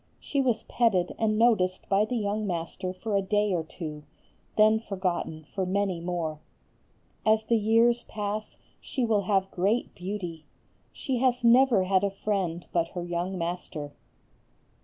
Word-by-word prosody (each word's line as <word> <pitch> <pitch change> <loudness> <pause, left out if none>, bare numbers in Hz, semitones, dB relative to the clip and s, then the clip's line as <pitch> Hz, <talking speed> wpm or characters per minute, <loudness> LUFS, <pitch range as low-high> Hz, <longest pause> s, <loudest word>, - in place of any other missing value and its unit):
She 280 - -1
was 250 -4 +1
petted 195 -7 +1
and 215 -1 +2
noticed 210 -6 +2
by 200 +2 +3
the 245 - -3
young 210 -1 -1
master 180 +1 -3
for 205 +3 -3
a 200 - +3
day 205 +1 +1
or 170 -2 0
two, 155 -2 -7 0.6
then 215 +1 +5
forgotten 185 -6 -3
for 195 - -1
many 190 -1 0
more. 165 -3 -3 0.8
As 220 0 +3
the 230 +2 +2
years 230 +2 +3
pass 210 0 -4 0.2
she 255 - -2
will 215 -3 +2
have 195 -1 +1
great 205 +7 0
beauty. 180 -4 -5 0.5
She 265 -4 -2
has 250 0 +1
never 240 -3 +6
had 190 +1 +2
a 200 - +2
friend 195 -4 -2
but 170 -1 +2
her 175 - -2
young 175 +2 -2
master. 165 -4 -4
200 Hz, 155 wpm, -27 LUFS, 180-220 Hz, 0.8 s, never